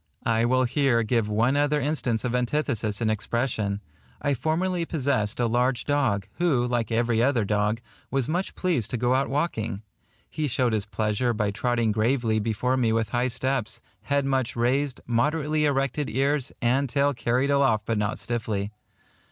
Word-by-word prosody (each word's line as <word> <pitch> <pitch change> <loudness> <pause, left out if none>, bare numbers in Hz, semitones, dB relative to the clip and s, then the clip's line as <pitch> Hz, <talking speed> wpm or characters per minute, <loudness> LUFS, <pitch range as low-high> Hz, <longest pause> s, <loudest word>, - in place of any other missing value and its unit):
I 115 0 +2
will 130 +1 +3
here 130 -2 +2
give 110 -1 0
one 115 +6 +2
other 145 +1 +2
instance 135 -5 -1
of 125 -1 -1
antithesis 120 -5 -1
in 110 - +2
expression. 110 -2 -1 0.4
I 145 -1 0
formerly 170 +7 0
possessed 130 -9 -1
a 120 - +2
large 125 +2 +1
dog, 125 -9 +1
who, 145 -9 +2
like 120 -2 -1
every 115 0 +2
other 120 -4 +2
dog, 105 +2 0 0.3
was 135 -3 0
much 180 +4 -2
pleased 165 - 0
to 125 - -2
go 120 +2 +1
out 135 +1 +1
walking. 115 - -2 0.4
He 155 -1 -2
showed 125 -2 +1
his 105 -1 -1
pleasure 110 +3 0
by 105 -2 0
trotting 115 +1 0
gravely 110 0 +1
before 115 +4 0
me 120 -3 +2
with 110 -1 0
high 120 +1 +1
steps, 130 -2 -2 0.2
head 140 -1 0
much 130 -3 0
raised, 130 +3 0
moderately 150 +5 +1
erected 140 +1 0
ears, 135 +2 0
and 130 +3 +2
tail 140 +2 +2
carried 125 +3 0
aloft 135 -7 +2
but 115 -2 0
not 105 +4 -1
stiffly. 110 -4 -3
125 Hz, 170 wpm, -26 LUFS, 110-140 Hz, 0.4 s, will